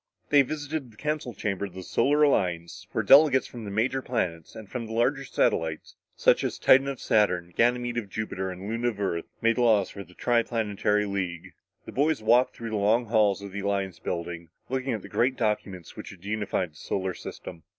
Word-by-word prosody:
They 145 -1 +7
visited 145 -1 -4
the 110 - -20
council 150 -5 -3
chamber 100 -1 -2
of 95 -2 -10
the 95 - -7
Solar 145 +10 +2
Alliance 85 - 0
where - - -1
delegates 140 -2 +6
from 120 -3 -9
the - - -5
major 115 +6 0
planets 90 -11 -3
and 110 -2 -9
from 115 +1 -5
the 110 - -7
larger 130 +5 +1
satellites, 80 - -1 0.2
such - - +3
as - - -2
Titan 135 +1 +5
of 140 -2 -4
Saturn, 90 -5 +1
Ganymede 120 0 +1
of 105 -4 -8
Jupiter, 95 -2 -3
and 95 +2 -7
Luna 115 +2 -1
of 110 -4 -2
Earth 85 -4 -1 0.2
made 115 +1 +3
the - - +2
laws 110 -5 +3
for 100 - -8
the 90 0 -19
tri 120 -1 +2
planetary 105 -2 0
league. 95 -4 -4 0.3
The - - -8
boys 145 -3 +1
walked 120 +3 +4
through 115 -1 -6
the 110 - -1
long 110 +4 +2
halls 105 -3 +2
of 100 - -7
the 100 - -5
Alliance 100 -2 -2
building, 85 -1 -5 0.2
looking 130 0 -1
at 110 - -4
the - - -8
great 130 +2 +1
documents 105 -5 -2
which - - -8
had 95 0 -13
unified 105 -4 -2
the 75 - -20
solar 95 +2 -2
system. 85 -1 -9
110 Hz, 210 wpm, -27 LUFS, 95-125 Hz, 0.3 s, They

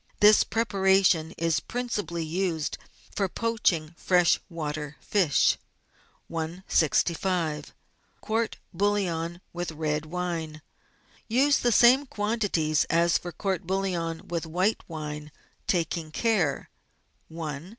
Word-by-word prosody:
This 210 +1 +7
prepara 195 -3 +2
tion 160 -3 +3
is 165 -1 +1
principally 205 -9 -3
used 165 -1 -2 0.4
for 195 -2 0
poaching 185 -8 0
fresh 180 -2 +3
water 150 -3 -4
fish. 180 -9 +2 0.7
i65 165 -1 0 0.5
COURT=BOUILLON 195 -6 -1
WITH 175 -1 -3
RED 155 0 -2
WINE 165 -3 -4 0.6
Use 275 +5 +3
the 240 - +2
same 250 +5 +6
quantities 205 - 0
as 170 +1 +3
for 175 - -7
court 190 0 -3
bouillon 180 -4 -2
with 170 -1 -3
white 185 +7 +1
wine, 150 -2 -6 0.4
taking 170 -2 0
care 175 -5 0 0.3
— 165 - -16
I. 155 +1 -5
170 Hz, 105 wpm, -27 LUFS, 160-200 Hz, 0.7 s, This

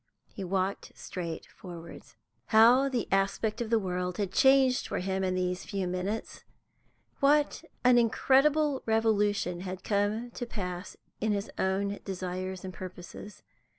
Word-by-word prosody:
He 195 - -6
walked 190 +1 -2
straight 170 -3 -6
forwards. 170 -2 -11 0.3
How 240 +5 +6
the 250 -4 -1
aspect 195 +3 0
of 230 - -3
the 230 - +4
world 180 -3 -2
had 200 -3 -1
changed 265 +1 +4
for - - -3
him 190 +1 -1
in 185 -1 0
these 180 0 -1
few 195 -2 -3
minutes; 185 +5 -4 0.8
what 290 +1 +3 0.2
an 250 -1 +6
incredible 275 +5 +3
revolution 210 -5 +1
had 185 0 -6
come 210 +4 0
to 245 0 -5
pass 180 -4 -5 0.2
in 215 0 +1
his 200 0 -3
own 200 +1 0
desires 185 0 -4
and 185 - -6
purposes! 185 +3 -9
200 Hz, 140 wpm, -29 LUFS, 185-230 Hz, 0.8 s, How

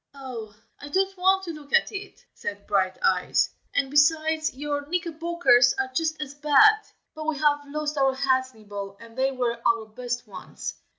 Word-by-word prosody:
"Oh! 240 -6 -8 0.2
I 290 - -9
don't 385 +4 +1
want 380 +1 +3
to 345 - -4
look 295 -2 -12
at - - +4
it!" 405 -1 -8
said 200 0 -6
Brighteyes; 190 -2 +1 0.2
"and 270 -1 +1
besides 315 +2 +3
your 285 +1 -4
knickerbockers 335 -7 +3
are 265 -1 -1
just 320 +2 -1
as 290 -2 -5
bad. 300 +9 +5 0.3
But 310 -1 -7
we 315 -2 0
have 290 0 +3
lost 300 0 -3
our 270 -1 +3
hats, 260 -1 +1
Nibble, 200 -2 -8
and 230 0 -14
they 265 +1 +1
were 240 -3 -2
our 230 -1 +2
best 245 +2 -5
ones. - - -7
285 Hz, 170 wpm, -25 LUFS, 245-315 Hz, 0.3 s, bad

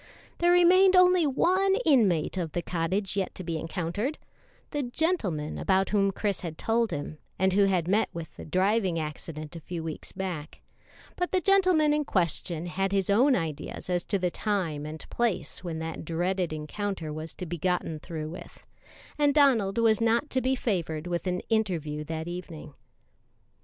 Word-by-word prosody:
There 345 0 +4
remained 370 +2 +6
only 365 -3 +6
one 375 +8 +3
inmate 205 - +3
of 170 -5 -3
the 175 - -2
cottage 185 +3 -1
yet 195 -2 -2
to 185 - -6
be 165 -2 -3
encountered 180 - -3 0.5
the 290 - -1
gentleman 240 - -1
about 190 0 +2
whom 200 -1 +3
Chris 200 -1 -2
had 165 -3 -6
told 230 0 +1
him, 150 0 -5 0.2
and 190 0 +2
who 200 +1 +5
had 180 -4 +1
met 205 +4 +2
with 165 -1 -8
the - - -9
driving 185 +1 +1
accident 155 0 -6
a - - -5
few 170 +1 -5
weeks 160 -1 -5
back; 180 -5 -5 0.5
but 360 0 -2
the 375 - +3
gentleman 365 -5 +4
in 300 0 +1
question 170 - -1
bad 195 0 0
his 195 -1 +1
own 255 +6 +5
ideas 165 +1 -4
as 175 -1 +1
to 200 - 0
the 180 -2 -1
time 170 -9 -2
and 155 +1 -8
place 235 -6 -1
when 170 -3 -4
that 160 0 -5
dreaded 175 +2 -1
encounter 155 +1 -4
was 155 +1 -6
to 180 - -6
be 170 0 -5
gotten 175 -2 -1
through 155 -1 -6
with, 175 - -11 0.5
and 290 -1 +3
Donald 235 -9 +4
was 225 -1 +3
not 230 +6 +2
to 260 - +1
be 260 +1 +1
favored 170 -10 -2
with 175 +1 -2
an 180 0 -1
interview 170 -9 -1
that 160 +1 -5
evening. 170 -4 -7
185 Hz, 175 wpm, -28 LUFS, 165-230 Hz, 0.5 s, remained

